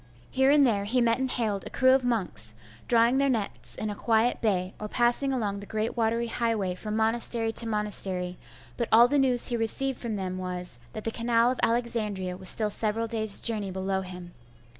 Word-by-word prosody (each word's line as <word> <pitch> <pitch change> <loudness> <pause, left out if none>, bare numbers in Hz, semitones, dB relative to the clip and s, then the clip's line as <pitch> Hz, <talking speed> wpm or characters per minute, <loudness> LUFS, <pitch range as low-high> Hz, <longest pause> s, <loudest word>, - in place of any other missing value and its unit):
Here 265 +1 +2
and 285 -1 +5
there 205 -5 0
he 245 +5 0
met 235 0 +2
and 260 0 -1
hailed 215 -6 -2
a - - -7
crew 260 0 +3
of 265 0 +3
monks, 175 - -1 0.3
drawing 235 +2 +3
their 275 0 +2
nets 125 - -3
in 215 - -4
a - - -6
quiet 225 +2 +1
bay, 185 -4 -1
or 215 - -5
passing 240 +5 +1
along 210 -6 -2
the 200 - -10
great 220 +1 -3
watery 230 0 0
highway 225 -5 -1
from 210 +4 -5
monastery 225 0 +1
to 230 - +3
monastery: 195 -4 -1 0.4
but 235 - -2
all 235 +2 +7
the 285 +2 +1
news 255 -3 +4
he 240 - -1
received 255 +3 0
from 230 -3 -4
them 185 -2 -4
was, 180 -7 -5
that 215 - -7
the 225 - -2
canal 235 +1 +1
of 255 - -5
Alexandria 220 -6 -1
was 185 0 +1
still 215 -2 +2
several 220 +2 -1
days' 220 -3 +2
journey 215 -4 0
below 190 +1 -2
him. 180 -2 -10
225 Hz, 205 wpm, -27 LUFS, 195-240 Hz, 0.4 s, all